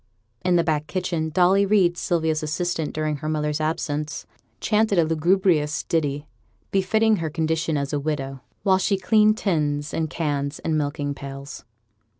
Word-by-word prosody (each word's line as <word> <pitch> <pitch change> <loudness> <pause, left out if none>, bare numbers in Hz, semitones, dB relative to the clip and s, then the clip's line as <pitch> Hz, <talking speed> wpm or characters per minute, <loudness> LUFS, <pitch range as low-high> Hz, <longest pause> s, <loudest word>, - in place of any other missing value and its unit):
In 180 -1 +3
the 170 - +4
back 155 -2 -1
kitchen 175 -4 -2
Dolly 185 +4 +4
Reid, 195 -4 +3
Sylvia's 160 -3 0
assistant 160 +1 -2
during 155 -1 -2
her 155 +2 -4
mother's 150 0 -1
absence, 155 -1 -2 0.3
chanted 215 -2 +2
a 170 - +5
lugubrious 165 -1 +2
ditty, 145 -3 -1 0.5
befitting 215 +3 +3
her 165 -2 -2
condition 160 0 -1
as 140 0 -3
a 145 - +1
widow, 135 -3 -3 0.2
while 190 -2 +4
she 195 +1 +1
cleaned 215 +3 +4
tins, 150 -8 -1
and 160 -1 -1
cans, 145 -3 -2
and 160 - -2
milking 145 -1 -1
pails. 140 0 -8
160 Hz, 155 wpm, -23 LUFS, 150-180 Hz, 0.5 s, a